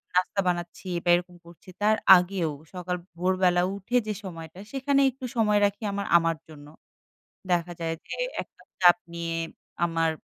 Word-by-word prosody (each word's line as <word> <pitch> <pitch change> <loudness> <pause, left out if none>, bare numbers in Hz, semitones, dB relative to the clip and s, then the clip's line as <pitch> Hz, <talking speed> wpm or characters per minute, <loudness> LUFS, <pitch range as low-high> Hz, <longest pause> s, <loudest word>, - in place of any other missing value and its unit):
নাস্তা 185 +2 +1
বানাচ্ছি 175 +1 -3 0.2
বা 175 - 0
এরকম 175 0 -4
করছি 170 +2 -16
তার 215 +1 +4 0.2
আগেও 180 -2 -1 0.2
সকাল 180 0 -3 0.2
ভোরবেলা 180 0 +2
উঠে 200 +6 -1
যে 215 - -1
সময়টা, 165 -3 -9
সেখানে 275 +1 +1
একটু 260 +1 -9
সময় 210 -3 +3
রাখি 205 +2 -2
আমার 200 0 -3
আমার 165 -1 +1
জন্য। 145 -2 -13 0.8
দেখা 175 0 +1
যায় 165 -1 -1
যে - - -4 0.3
একটা - - -15 0.2
চাপ 175 +2 +7 0.2
নিয়ে 170 0 -3 0.5
আমার 165 -1 +1
180 Hz, 150 wpm, -26 LUFS, 170-200 Hz, 0.8 s, চাপ